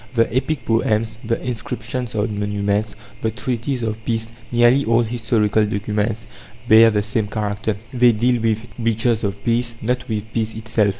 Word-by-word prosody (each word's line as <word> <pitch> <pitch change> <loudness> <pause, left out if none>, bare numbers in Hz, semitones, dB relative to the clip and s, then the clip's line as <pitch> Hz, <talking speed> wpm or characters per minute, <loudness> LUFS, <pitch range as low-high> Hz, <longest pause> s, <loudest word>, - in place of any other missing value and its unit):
The 115 0 +2
epic 130 0 -1
poems, 110 0 0
the 115 0 -1
inscriptions 120 +1 -3
on 105 0 -1
monuments, 105 0 -1 0.3
the 110 - +1
treaties 120 +3 -2
of 110 0 -3
peace 115 0 -2 0.2
nearly 120 +3 +4
all 115 0 +3
historical 110 -2 +1
documents 105 +2 -1 0.4
bear 115 +1 +8
the 105 -2 0
same 105 0 -1
character; 105 0 -2 0.2
they 125 -1 +5
deal 120 +2 +1
with 110 0 0
breaches 115 0 +1
of 100 0 -3
peace, 120 0 +1
not 125 +2 -1
with 105 -2 -1
peace 110 -1 -1
itself. 110 -1 +1
110 Hz, 160 wpm, -20 LUFS, 105-120 Hz, 0.4 s, bear